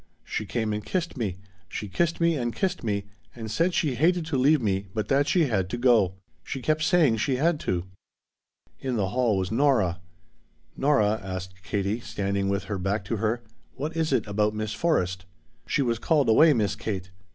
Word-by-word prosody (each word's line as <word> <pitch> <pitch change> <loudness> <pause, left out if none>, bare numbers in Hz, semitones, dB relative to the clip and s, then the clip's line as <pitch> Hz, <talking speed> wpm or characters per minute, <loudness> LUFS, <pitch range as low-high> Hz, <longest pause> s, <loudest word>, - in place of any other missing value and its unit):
She 105 - -4
came 110 -2 -1
and 105 0 -3
kissed 175 - -2
me 105 -8 -2 0.3
she 105 - -5
kissed 165 - 0
me 170 -1 +3
and 120 -4 -2
kissed 185 -1 -1
me 100 -3 -1 0.3
and 110 -3 -6
said 170 +9 +1
she 150 -5 +1
hated 165 +6 +2
to 160 -2 -2
leave 140 +4 +4
me 100 -4 -1
but 105 -2 -2
that 140 +1 +3
she 175 -3 +3
had 95 -8 0
to 120 - -3
go. 120 -7 +3 0.3
She 135 - -5
kept 155 +4 0
saying 160 -8 +4
she 130 +5 0
had 155 +4 +1
to." 90 -1 -2 0.9
In 130 -2 -2
the 100 -4 0
hall 120 -2 +1
was 95 0 -2
Nora. 115 -9 +2 0.8
"Nora," 110 -7 +2
asked 95 0 -6
Katie, 100 +5 -1
standing 100 -3 -2
with 100 0 0
her 100 -3 -4
back 100 +4 -1
to 115 - -2
her, 115 +3 -1 0.3
"what 150 +4 -4
is 160 -2 0
it 125 -5 +2
about 105 +1 0
Miss 110 0 -3
Forrest?" 95 - 0 0.4
"She 140 - +1
was 115 -2 0
called 145 -1 +2
away, 155 +8 +7
Miss 105 -5 0
Kate. 95 -3 -4
115 Hz, 195 wpm, -26 LUFS, 100-145 Hz, 0.9 s, away